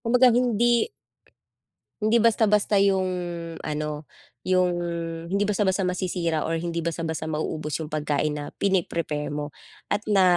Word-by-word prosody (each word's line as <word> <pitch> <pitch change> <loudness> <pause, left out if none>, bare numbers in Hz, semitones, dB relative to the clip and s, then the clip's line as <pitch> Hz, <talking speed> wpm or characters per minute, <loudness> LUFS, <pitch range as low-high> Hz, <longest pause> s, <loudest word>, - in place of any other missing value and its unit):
kumbaga 245 +1 +5
hindi 240 - +3 1.1
hindi 220 +2 +4
basta-basta 215 -2 +3
yung 190 -1 +3 0.6
ano, 150 0 -3 0.4
yung 185 -1 +3 0.6
hindi 200 +2 +2
basta-basta 195 -2 +1
masisira 175 -3 -1
or 165 0 -1
hindi 170 0 -2
basta-basta 165 -1 -3
mauubos 155 0 -2
yung 155 - -4
pagkain 150 0 0
na 145 - -4
pine-prepare 170 -6 0
mo. 145 0 -4 0.3
At 205 +1 0
na 185 -3 +5
180 Hz, 120 wpm, -25 LUFS, 155-210 Hz, 1.1 s, kumbaga